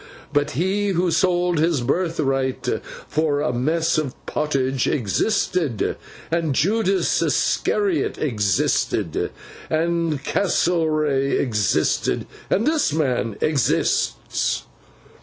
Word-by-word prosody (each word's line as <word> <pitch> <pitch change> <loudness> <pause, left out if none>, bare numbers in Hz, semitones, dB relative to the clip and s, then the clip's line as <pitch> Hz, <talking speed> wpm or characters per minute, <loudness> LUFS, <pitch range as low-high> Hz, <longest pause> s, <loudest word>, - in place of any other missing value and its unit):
But 145 0 +1
he 195 +5 +1
who 180 -2 +1
sold 175 0 +2
his 160 -4 +2
birthright 135 -3 -1 0.4
for 155 -2 0
a 145 -4 0
mess 155 +6 +1
of 140 -4 -3
pottage 135 -4 0
existed, 145 - 0 0.4
and 165 -4 0
Judas 195 - +2
Iscariot 395 -5 +1
existed, 105 - 0 0.4
and 165 -2 0
Castlereagh 155 -7 +1
existed, 105 -6 +1 0.2
and 210 - +2
this 310 - +2
man 125 -8 0
exists! 135 - 0
155 Hz, 90 wpm, -22 LUFS, 135-175 Hz, 0.4 s, sold